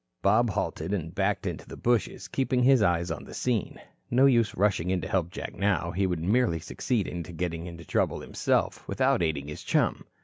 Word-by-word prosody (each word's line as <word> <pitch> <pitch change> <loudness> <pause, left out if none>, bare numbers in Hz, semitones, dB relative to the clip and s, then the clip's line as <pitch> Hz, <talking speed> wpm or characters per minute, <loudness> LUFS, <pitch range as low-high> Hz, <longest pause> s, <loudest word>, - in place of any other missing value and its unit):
Bob 115 +4 +4
halted, 95 0 -2
and 80 -3 -5
backed 95 0 0
into - - -4
the - - -9
bushes, 120 -2 0
keeping 130 -2 0
his 130 -1 +6
eyes 85 -3 +2
on 80 - -4
the - - -10
scene. 120 -6 -1 0.3
No 130 +3 +5
use 120 -5 +3
rushing 95 -3 +1
in 95 -1 +1
to - - -4
help 95 -5 0
Jack 95 - -6
now. 95 -4 0
He 95 +2 +1
would 90 -3 -2
merely 110 -1 +2
succeed 110 - -2
in 90 - -4
getting 85 0 -4
into 85 -1 -9
trouble - - 0
himself, - - -1
without - - +2
aiding 75 -4 -1
his 75 - -7
chum. - - 0
95 Hz, 200 wpm, -28 LUFS, 85-115 Hz, 0.3 s, his